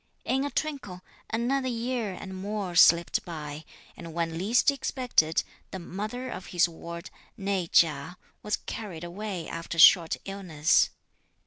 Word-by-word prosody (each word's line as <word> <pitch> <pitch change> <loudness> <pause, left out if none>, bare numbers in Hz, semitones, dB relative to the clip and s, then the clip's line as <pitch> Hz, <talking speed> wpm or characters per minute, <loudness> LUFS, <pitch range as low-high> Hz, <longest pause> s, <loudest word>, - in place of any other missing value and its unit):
In 265 +1 +1
a 285 - -1
twinkle, 265 -14 -4 0.3
another 255 +4 0
year 240 -3 -2
and 190 +1 -8
more 200 -1 -4
slipped 170 0 +5
by, 155 -2 -7 0.3
and 165 -2 -9
when 165 -1 -1
least 220 - +3
expected, 250 - +1 0.3
the - - -6
mother 210 +8 -5
of 190 -7 -7
his 175 0 +3
ward, 170 +1 -9 0.3
née 195 -4 -2
Chia, 165 +2 +3 0.2
was 210 0 -1
carried 185 -7 -6
away 185 0 -5
after 165 0 -5
a - - -1
short 165 0 +7
illness. 180 -6 +2
185 Hz, 140 wpm, -28 LUFS, 170-225 Hz, 0.3 s, short